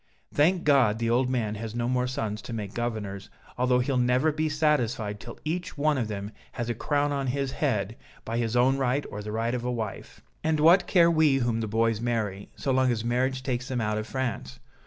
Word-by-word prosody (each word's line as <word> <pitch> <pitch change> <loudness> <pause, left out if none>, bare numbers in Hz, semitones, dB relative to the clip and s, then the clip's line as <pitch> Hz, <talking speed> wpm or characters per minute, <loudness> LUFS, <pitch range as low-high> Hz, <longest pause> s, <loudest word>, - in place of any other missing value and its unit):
Thank 170 +5 +3
God, 135 -8 +4
the 115 0 0
old 125 +2 +2
man 115 -5 -1
has 110 +1 -6
no 120 0 -1
more 125 0 +1
sons 110 -4 -3
to 120 - -7
make 105 -2 -5
governors, 110 -5 -4 0.3
although 125 0 +2
he'll 125 +1 0
never 125 +5 +3
be 155 +1 -1
satisfied 125 -9 0
till 95 - -9
each 175 +2 -3
one 150 +1 +2
of 120 -5 -1
them 105 -1 -5 0.2
has 120 0 -2
a - - 0
crown 145 +5 0
on 140 -1 -1
his 135 +1 -1
head, 115 -7 -1 0.3
by 115 +1 -2
his 115 0 -1
own 130 +3 +3
right 135 +2 +1
or 105 - -5
the 105 +1 -6
right 115 +2 -1
of 125 -1 -2
a 125 - -1
wife." 110 -4 -5 0.2
"And 155 -1 +1
what 170 +5 +6
care 170 -2 +5
we 155 -4 +4
whom 120 -3 0
the 110 - -2
boys 115 +1 +1
marry, 110 -5 -2
so 135 - -2
long 130 -1 +3
as 115 -1 -2
marriage 130 +2 0
takes 125 -1 -2
them 130 -3 -2
out 105 -1 0
of 110 - -5
France? 125 - -4
125 Hz, 220 wpm, -27 LUFS, 110-135 Hz, 0.3 s, what